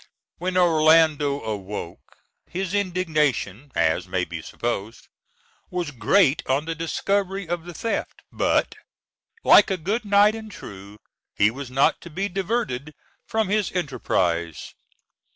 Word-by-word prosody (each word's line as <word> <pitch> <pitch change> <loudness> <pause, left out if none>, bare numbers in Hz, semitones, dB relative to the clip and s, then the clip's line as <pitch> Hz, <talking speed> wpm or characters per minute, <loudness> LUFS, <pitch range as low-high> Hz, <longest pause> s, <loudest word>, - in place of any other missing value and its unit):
When 185 +1 -1
Orlando 155 -4 +4
awoke, 100 -5 -6 0.3
his 190 +1 -3
indignation, 155 - 0
as 80 -1 +1
may - - -1
be - - -6
supposed, 115 -1 -4 0.6
was 175 -4 -3
great 145 - +3
on 135 +3 +1
the 165 - -2
discovery 195 +3 -1
of 170 0 -3
the 175 - -8
theft; 230 - -3
but, - - +1 0.7
like 205 - +7
a 190 - 0
good 205 +8 -2
knight 205 +1 +5
and 220 -1 -8
true, 100 - -11 0.4
he 100 +1 +4
was 135 +1 -7
not 135 +2 +2
to 170 - -10
be 195 +5 -2
diverted 180 - -2 0.3
from 220 -3 0
his 210 -2 +1
enterprise. 90 - -1
160 Hz, 130 wpm, -24 LUFS, 125-195 Hz, 0.7 s, like